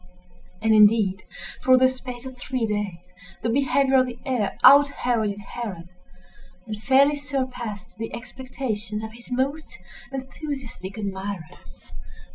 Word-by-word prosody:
And, 220 0 +4
indeed, 210 -2 +5 0.4
for 255 0 +6
the 260 0 +6
space 255 -1 -6
of 260 -1 -7
three 250 -1 -2
days, 205 -5 -3 0.4
the 230 - +1
behavior 270 +1 +3
of 255 - +2
the 240 -1 -7
heir 245 -7 -1
out 285 +1 +9
Heroded 220 -7 -1
Herod, 200 -5 -7 0.8
and 215 -2 -6
fairly 275 +4 +5
surpassed 255 -9 -4
the 225 - -4
expectations 235 -4 -5
of 220 0 -7
his 235 +1 -14
most 275 +5 -2 0.3
enthusiastic 265 -6 -6
admirers. 195 -4 -6
240 Hz, 125 wpm, -24 LUFS, 210-260 Hz, 0.8 s, out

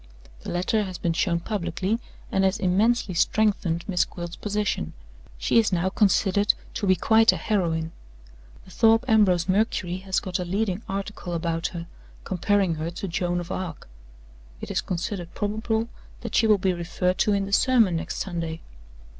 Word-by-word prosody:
The - - -7
letter 185 +5 0
has 185 -2 -6
been 170 0 -1
shown 170 0 0
publicly, 190 +2 -2 0.3
and 195 - +2
has 190 +2 +2
immensely 205 +2 +2
strengthened 175 -3 +1
Miss 180 -4 +2
Gwilt's 175 -1 -7
position. 205 - -2 0.4
She 65 - +3
is 220 - +2
now 180 +1 +1
considered 200 0 +3 0.2
to 205 - -2
be 185 - +5
quite 225 +3 +5
a - - -3
heroine. 165 -6 -1 0.7
The 185 - -15
Thorpe 225 +3 +4
Ambrose 190 -7 +4
Mercury 185 -3 0
has 190 0 -1
got 185 -1 -3
a - - -1
leading 195 +2 -1
article 195 -2 -4
about 165 0 -1
her, 170 -2 -6 0.4
comparing 195 -1 +1
her 165 - -2
to 180 +4 -5
Joan 175 0 -1
of 175 - -6
Arc. 175 -5 -5 0.7
It - - -6
is - - 0
considered 175 -1 -4
probable 220 +2 -1 0.3
that - - -6
she 225 - +4
will 210 -1 +5
be 185 -1 +1
referred 180 +2 -1
to 210 - +3
in 200 -1 +1
the 200 - -6
sermon 225 -8 +4
next - - -4
Sunday. 170 -3 -4
190 Hz, 170 wpm, -25 LUFS, 175-210 Hz, 0.7 s, be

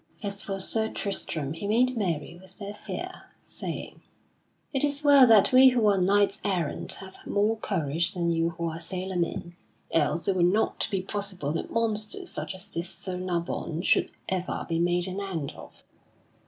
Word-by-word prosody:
As 200 0 -1
for 195 -2 -4
Sir 220 +3 0
Tristram 160 -7 -2
he 165 +5 -5
made 250 +4 +3
merry 170 -8 -2
with 190 - -12
their 205 -1 -6
fear, - - -7 0.2
saying: - - -4 0.7
"It 270 - +1
is 290 0 +4
well 285 -3 +8
that 220 -4 +6
we 260 +1 +8
who 245 -3 +2
are 200 -2 +4
knights 200 +2 +3
errant 180 -7 -1
have 190 -1 -10
more 210 +2 +2
courage 170 -2 -1
than 170 -1 +1
you 165 0 +1
who 170 0 -4
are 165 0 -4
sailor 185 +3 -4
men, 175 0 -2 0.4
else 155 +1 +1
it 195 - +2
would 175 -1 +4
not 215 +3 +1
be 190 -2 -1
possible 190 -7 -3
that 165 - -3
monsters 230 - -1
such - - -3
as 185 - -11
this 170 +2 -3
Sir 185 -1 -5
Nabon 170 -2 -3
should - - +3 0.2
ever 185 -1 -2
be 165 -1 -1
made 175 +1 +2
an 185 +1 -4
end 170 -8 -3
of." - - -14
190 Hz, 180 wpm, -27 LUFS, 170-210 Hz, 0.7 s, well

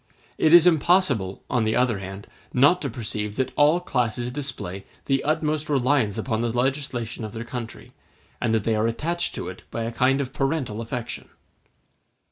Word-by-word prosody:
It 155 - +4
is 175 0 +9
impossible, 155 - +2
on 120 -3 +1
the 110 0 +1
other 125 -4 +2
hand, 95 +1 -8 0.3
not 145 +8 +4
to 140 - -2
perceive 105 -3 -4
that 130 +1 -1
all 150 +4 +5
classes 120 -6 -1
display 125 -9 -4 0.2
the 135 -1 +1
utmost 155 0 0
reliance 130 -6 +2
upon 115 -3 -1
the 120 -1 0
legislation 125 -2 -2
of 110 - -6
their 115 0 -5
country, 120 -1 -7 0.5
and 120 - +1
that 110 -2 +1
they 115 - +1
are 110 +1 +1
attached 170 +9 -1
to - - -5
it - - -8
by 115 - -3
a 115 - -3
kind 130 +3 +2
of 135 -2 -3
parental 135 -6 -1
affection. 115 +1 -5
125 Hz, 175 wpm, -24 LUFS, 110-145 Hz, 0.5 s, is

